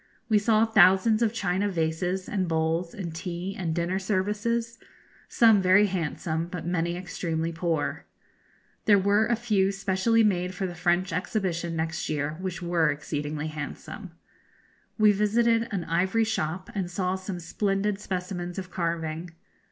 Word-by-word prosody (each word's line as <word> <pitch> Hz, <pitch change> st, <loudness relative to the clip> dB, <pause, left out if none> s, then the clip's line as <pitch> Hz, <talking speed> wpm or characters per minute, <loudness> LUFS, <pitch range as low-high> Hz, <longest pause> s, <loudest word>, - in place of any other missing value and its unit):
We 215 Hz, -2 st, +5 dB
saw 215 Hz, +1 st, +3 dB
thousands 215 Hz, +1 st, +5 dB
of 225 Hz, -2 st, +3 dB
china 200 Hz, -2 st, 0 dB
vases, 180 Hz, +2 st, -1 dB
and 190 Hz, -3 st, -1 dB
bowls, 165 Hz, +1 st, -1 dB
and 175 Hz, -5 st, -5 dB
tea 180 Hz, +3 st, -5 dB
and 165 Hz, -4 st, -2 dB
dinner 175 Hz, +2 st, 0 dB
services, 210 Hz, +4 st, -1 dB, 0.5 s
some 225 Hz, -4 st, +5 dB
very 190 Hz, +3 st, +5 dB
handsome, 165 Hz, -3 st, -2 dB
but 175 Hz, -2 st, -6 dB
many 170 Hz, 0 st, -1 dB
extremely 165 Hz, -2 st, -3 dB
poor. 165 Hz, -2 st, -2 dB, 0.8 s
There 205 Hz, -2 st, +6 dB
were 200 Hz, +3 st, +3 dB
a 235 Hz, -, +2 dB
few 210 Hz, -5 st, +1 dB
specially 195 Hz, +4 st, +2 dB
made 180 Hz, -3 st, +1 dB
for 190 Hz, -, -2 dB
the 180 Hz, -, -4 dB
French 175 Hz, +1 st, 0 dB
Exhibition 175 Hz, -2 st, -2 dB
next 160 Hz, 0 st, -2 dB
year, 150 Hz, -1 st, -1 dB
which 185 Hz, -1 st, -4 dB
were 170 Hz, -2 st, +2 dB
exceedingly 150 Hz, +1 st, -3 dB
handsome. 155 Hz, +5 st, -7 dB, 0.8 s
We 215 Hz, -1 st, +6 dB
visited 225 Hz, +3 st, +2 dB
an 195 Hz, -4 st, -2 dB
ivory 185 Hz, +7 st, +1 dB
shop, 185 Hz, -5 st, -2 dB
and 190 Hz, -4 st, -2 dB
saw 180 Hz, +1 st, -1 dB
some 190 Hz, -1 st, -5 dB
splendid 195 Hz, +4 st, -1 dB
specimens 180 Hz, -2 st, -4 dB
of 185 Hz, -1 st, -6 dB
carving. 165 Hz, -1 st, -2 dB
185 Hz, 145 wpm, -27 LUFS, 170-205 Hz, 0.8 s, There